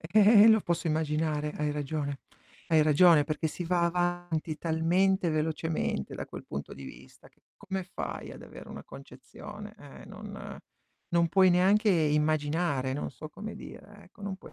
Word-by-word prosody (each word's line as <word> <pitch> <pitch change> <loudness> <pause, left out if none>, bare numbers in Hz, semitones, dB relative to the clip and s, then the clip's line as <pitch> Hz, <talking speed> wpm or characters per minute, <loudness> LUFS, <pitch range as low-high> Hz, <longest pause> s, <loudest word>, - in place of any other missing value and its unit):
Eh, 205 +5 +6
eh, 225 - +8
lo 220 -1 +6
posso 170 -1 -2
immaginare, 155 -1 -1
hai 150 0 -1
ragione. 145 -1 -3 0.5
Hai 160 -2 +5
ragione 155 0 +6
perché 155 +2 -2
si 175 +3 -5
va 175 0 +1
avanti, 175 -2 -1
talmente 175 +4 +1
velocemente, 155 - -2
da - - -6
quel - - -9
punto 70 0 -6
di 70 - -10
vista, 65 0 -13
che - - -36
come 190 -2 -5
fai - - -6
ad - - -11
avere - - -12
una - - -8
concezione? 70 0 -11
Eh, - - -13
non - - -9 0.6
non 170 -1 +3
puoi 190 +2 +5
neanche 195 +4 +4
immaginare, 150 -3 +1
non 140 - -3
so 155 - -10
come 210 +7 -8
dire, 205 0 -12
ecco, 185 +3 -21
non 200 -1 -4
puoi - - -14
160 Hz, 165 wpm, -29 LUFS, 150-185 Hz, 0.6 s, eh